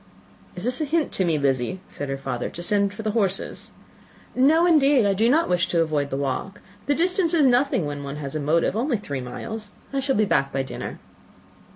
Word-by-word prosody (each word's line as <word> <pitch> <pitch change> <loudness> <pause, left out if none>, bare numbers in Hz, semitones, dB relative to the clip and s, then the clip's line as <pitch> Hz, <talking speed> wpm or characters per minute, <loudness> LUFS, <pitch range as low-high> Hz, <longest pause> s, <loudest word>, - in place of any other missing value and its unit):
"Is 180 - -6
this 250 +5 0
a - - +1
hint 315 +1 0
to 190 - +1
me, 165 -3 +1
Lizzy," 140 +5 0
said 145 - -6
her 135 - -2
father, 125 -3 -4
"to 175 - -6
send 200 +1 +2
for 220 +2 -8
the 215 - 0
horses?" 200 -4 -2 0.6
"No, 305 +6 +4
indeed. 285 -7 +4
I 200 - +3
do 220 +4 +2
not 320 +6 +3
wish 180 -1 +1
to 170 - +1
avoid 150 -3 0
the 135 - -3
walk. 140 +9 -3 0.3
The 285 - +2
distance 350 +1 +2
is 305 -4 +4
nothing, 250 - +2
when 145 -1 -5
one 140 0 -5
has 145 -1 -6
a - - -1
motive; 160 +6 +1
only 240 +2 0
three 145 -10 -5
miles. 215 - -6 0.2
I 275 - 0
shall 270 0 0
be 215 - +3
back 135 -8 +1
by 135 0 -1
dinner." 130 - -6
200 Hz, 220 wpm, -24 LUFS, -, 0.6 s, No